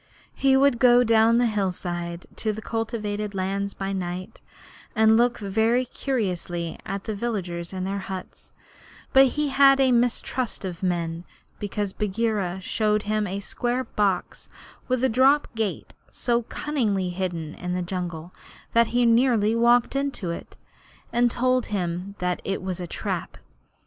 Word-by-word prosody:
He 270 -1 +3
would 275 -3 +4
go 245 0 +6
down 225 0 +4
the 245 - +3
hillside 180 -5 -2
into 215 - -2
the 220 - -7
cultivated 210 -3 -3
lands 195 +1 -2
by 195 0 -3
night, 180 -1 -5 0.5
and 220 0 +5
look 240 +1 +3
very 220 +5 +1
curiously 180 -10 -3
at 195 0 -4
the 220 - -3
villagers 185 -6 -3
in 185 -1 -4
their 195 +1 -2
huts, 190 -1 -8 0.6
but 270 0 +8
he 300 -1 +1
had 275 0 +6
a 265 -1 +4
mistrust 240 -1 0
of 175 -3 -6
men 170 -2 -1 0.4
because 205 -1 -3
Bagheera 205 -3 -1
showed 210 +2 0
him 215 0 0
a 195 +2 -4
square 245 +5 -2
box 205 -6 -1 0.4
with 255 -1 0
a - - +5
drop 265 +5 +4
gate 220 -3 -3 0.2
so 240 -1 0
cunningly 220 -8 -1
hidden 175 -4 -3
in 180 0 -4
the 180 - -1
jungle 175 -2 -5 0.4
that 230 0 +5
he 245 +1 +2
nearly 230 -2 +3
walked 240 +2 +3
into 275 -10 -2
it, 170 - -8 0.6
and 240 0 +4
told 255 +1 +1
him 185 0 -3
that 180 -1 -1
it 195 -1 -3
was 185 -1 -3
a 175 - -5
trap. - - -4
210 Hz, 150 wpm, -25 LUFS, 185-240 Hz, 0.6 s, but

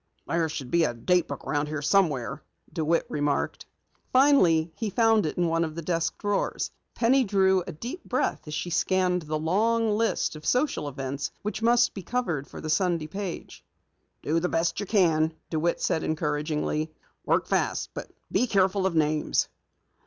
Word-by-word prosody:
"There 165 -1 0
should 140 -5 -6
be 170 -1 +4
a 120 - 0
date 175 +9 +2
book - - -7
around 145 0 0
here 150 -1 -4
somewhere," 155 -7 +1 0.3
DeWitt 165 +1 +1
remarked. 145 -1 -1 0.4
Finally 185 - +4
he 220 - -2
found 225 -3 +3
it - - -5
in 175 - +2
one 165 0 +1
of 155 -1 -4
the 170 - -5
desk 170 0 -1
drawers. 205 -1 -1 0.2
Penny 255 +3 +4
drew 190 -3 +3
a - - -4
deep 240 - -7
breath 250 -9 -1
as 150 - -4
she 160 +4 -3
scanned 180 +1 +1
the 155 -1 -3
long 220 +8 +1
list 225 -5 0
of 155 - -10
social 250 - 0
events 140 +1 -4
which 210 +1 -3
must 240 +1 +4
be 195 - -6
covered 175 - -2
for - - -10
the 155 - -6
Sunday 170 -1 +1
page. 195 +1 -6 0.6
"Do 160 +3 +1
the 180 +2 -1
best 165 +2 0
you 205 - -4
can," 165 -6 +2 0.2
DeWitt 165 +1 0
said 160 - 0
encouragingly. 150 0 -1 0.3
"Work - - +1
fast, - - -1
but - - -7 0.2
be 250 - +2
careful 190 -2 +2
of 180 - -3
names." 155 -1 +1
170 Hz, 175 wpm, -27 LUFS, 155-205 Hz, 0.6 s, be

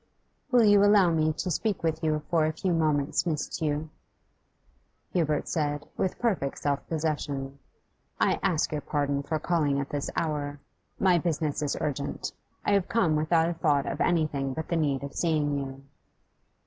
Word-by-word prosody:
'Will 245 -3 +5
you 205 -1 +6
allow 205 -4 +5
me 155 -1 +2
to 180 - -3
speak 210 +1 -1
with 160 0 -1
you 155 -1 +1
for 160 -2 +3
a - - 0
few 180 +3 -1
moments, 155 -1 +1
Miss 150 -3 0
Tew?' 150 0 -2 1.3
Hubert 155 -4 +1
said, 145 -2 -1
with 190 - -1
perfect 190 - -1
self 145 -1 -2
possession. 145 -4 -2 0.6
'I - - +2
ask 160 -4 +1
your 150 -1 -2
pardon 140 -1 -1
for 155 +3 -2
calling 150 -3 +1
at 140 - -3
this 145 -2 -3
hour. 145 -2 -2 0.4
My 180 -2 +4
business 155 -3 -1
is 145 -2 -1
urgent; 145 -1 -3 0.3
I - - +2
have 200 -2 +2
come 175 -9 +2
without 160 +2 +2
a - - -1
thought 150 -4 +1
of 140 - -3
anything 145 -6 +1
but 160 - -5
the 170 - +1
need 145 -4 0
of 140 - -6
seeing 150 -4 +1
you. 135 0 -7
155 Hz, 170 wpm, -28 LUFS, 145-170 Hz, 1.3 s, you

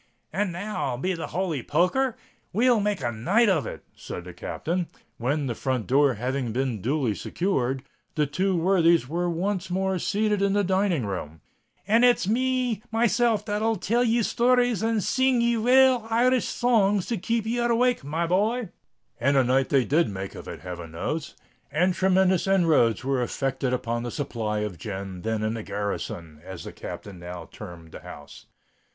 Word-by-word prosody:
"And 205 -2 0
now, 175 - -3
be 185 +8 -1
the 165 -2 -4
holy 170 -5 -2
poker 175 - +1
r! 255 -3 -1 0.4
we'll 240 +3 +4
make 205 -4 -1
a 120 - 0
night 195 - +2
of 165 -7 +1
it," - - -7
said 90 - -7
the 90 0 -10
Captain, 170 - -3 0.3
when, 140 +5 -1
the 125 - -1
front 130 -3 -2
door 140 0 +3
having 125 +2 -2
been 125 -3 -2
duly 130 -1 0
secured, 135 - -1 0.3
the 150 - +2
two 185 +6 0
worthies 170 -4 +3
were 175 +4 -1
once 185 +2 -2
more 190 0 0
seated 210 +2 0
in 200 0 +2
the 205 0 +2
dining 185 - +1
room: 80 -6 -5 0.5
"and 225 +3 +4
it's 245 -6 +4 0.6
myself 230 0 +2
that'll 215 +2 0
tell 230 +5 +1
ye 235 0 +2
stories 245 -2 +2
and 225 -2 +1
sing 260 +3 +2
ye 235 0 +2
rale 250 0 +4
Irish 245 +2 +3
songs 210 -5 +2
to 235 - -2
keep 225 +3 -1
ye 235 +2 -1
awake, 240 - +2
my 160 +4 -1
boy." 210 +6 +1 0.5
And 140 +3 +2
a 135 - +5
night 130 +2 +2
they 135 -3 +3
did 160 +4 +2
make 95 -1 -6
of - - -10
it, - - -7
heaven 85 -3 -7
knows!—and 160 - -3
tremendous 190 0 +2
inroads 165 - +3
were 135 -1 0
effected 135 +1 -1
upon 120 -2 -1
the 120 - -4
supply 110 -6 -3
of 100 -6 -4
gin 95 -2 -6
then 110 +1 -2
in 110 +1 0
the 115 - -4
"garrison," 85 -7 -5
as 95 -2 -8
the - - -8
Captain 100 -4 -8
now 85 -1 -8
termed 85 -5 -10
the - - -9
house. 75 0 -12
170 Hz, 175 wpm, -25 LUFS, -, 0.6 s, a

